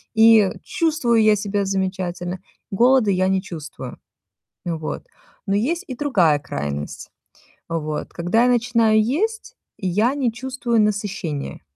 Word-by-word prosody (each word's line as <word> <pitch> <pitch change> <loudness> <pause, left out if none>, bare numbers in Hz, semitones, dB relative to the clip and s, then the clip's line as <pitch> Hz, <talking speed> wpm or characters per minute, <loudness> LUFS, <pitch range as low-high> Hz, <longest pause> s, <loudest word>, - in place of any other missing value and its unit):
и 220 -3 +6
чувствую 280 -9 +1
я 215 -1 +5
себя 205 0 -1
замечательно. 185 -2 -2 0.3
Голода 240 +1 +4
я 185 0 +2
не 190 0 +1
чувствую, 160 -6 -8 0.7
вот. 165 -3 -4 0.4
Но 200 - +2
есть 335 - 0
и 255 - -5
другая 185 - +2
крайность. 70 - -5 0.6
Вот, 155 -2 -3
когда 180 +7 +1
я 250 - +4
начинаю 230 -2 +3
есть, 440 - -2 0.2
я 210 +7 +1
не 255 -5 0
чувствую 250 -2 -1
насыщения. 200 -8 -2
210 Hz, 120 wpm, -21 LUFS, 180-240 Hz, 0.7 s, и